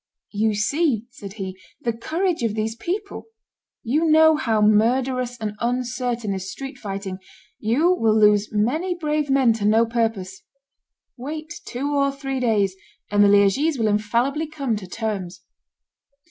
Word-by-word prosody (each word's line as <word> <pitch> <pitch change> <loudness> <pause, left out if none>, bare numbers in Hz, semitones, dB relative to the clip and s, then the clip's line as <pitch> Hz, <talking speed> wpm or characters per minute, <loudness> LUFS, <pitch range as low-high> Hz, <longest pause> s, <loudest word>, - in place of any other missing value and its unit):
"You 215 0 0
see," 235 +1 0
said 200 -5 -10
he, 190 -3 -6 0.2
"the 235 - -1
courage 330 - -1
of 225 -3 -1
these 220 +1 -2
people; 400 - -5 0.6
you 290 +8 +1
know 315 0 +6
how 230 -8 0
murderous 245 +4 +2
and 215 -3 -4
uncertain 245 -2 -2
is 190 0 -5
street 270 +4 -8
fighting; 195 -2 -5 0.4
you 280 +12 +2
will 220 -9 +2
lose 210 0 +4
many 300 - 0
brave 300 -3 -1
men 265 -4 +4
to 215 -2 -3
no 220 +2 +4
purpose. 225 -5 -2 0.8
Wait 310 +6 -6
two 280 +4 -3
or 275 -1 +2
three 270 -1 -4
days, 210 -6 +1 0.4
and 205 0 +4
the - - +6
Liegese 205 +10 +3
will 225 -2 +1
infallibly 235 +9 0
come 280 -6 -2
to 195 -3 -8
terms." 195 -3 -4
235 Hz, 145 wpm, -22 LUFS, 210-280 Hz, 0.8 s, know